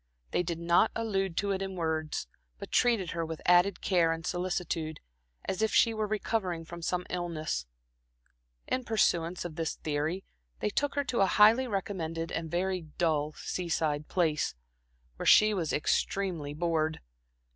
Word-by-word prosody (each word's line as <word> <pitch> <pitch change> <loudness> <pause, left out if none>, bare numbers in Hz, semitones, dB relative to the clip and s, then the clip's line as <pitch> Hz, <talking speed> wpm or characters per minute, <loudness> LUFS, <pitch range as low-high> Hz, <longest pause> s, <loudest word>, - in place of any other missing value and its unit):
They - - +2
did 170 -1 -3
not 170 +5 +3
allude 195 -6 -1
to 200 0 +1
it 195 0 -1
in 190 -1 -4
words, 160 - -2 0.3
but - - -9
treated 230 -8 +2
her 165 0 -2
with 160 -1 -5
added 180 +2 +4
care 170 -4 +3
and 165 0 -4
solicitude, 175 -3 -2 0.5
as 190 - -2
if 220 - +2
she 230 - +5
were 215 -1 -1
recovering 200 -5 -1
from 170 +1 -9
some 180 +1 -1
illness. 155 - -3 1.0
In 255 - -1
pursuance 180 -7 +1
of 165 -2 -6
this 165 -1 -2
theory, 155 +5 -2 0.4
they 210 - -1
took 285 +6 0
her 285 - +1
to 255 -3 -2
a 195 - +5
highly 220 +7 +5
recommended 170 -6 -3
and 165 -1 -3
very 185 +2 -1 0.2
dull 155 -3 +1
seaside 160 -5 -2
place, 155 - 0 0.6
where - - -3
she 215 0 +7
was 170 -6 -1
extremely 160 -1 -1
bored. 160 -1 0
175 Hz, 155 wpm, -30 LUFS, 160-195 Hz, 1.0 s, she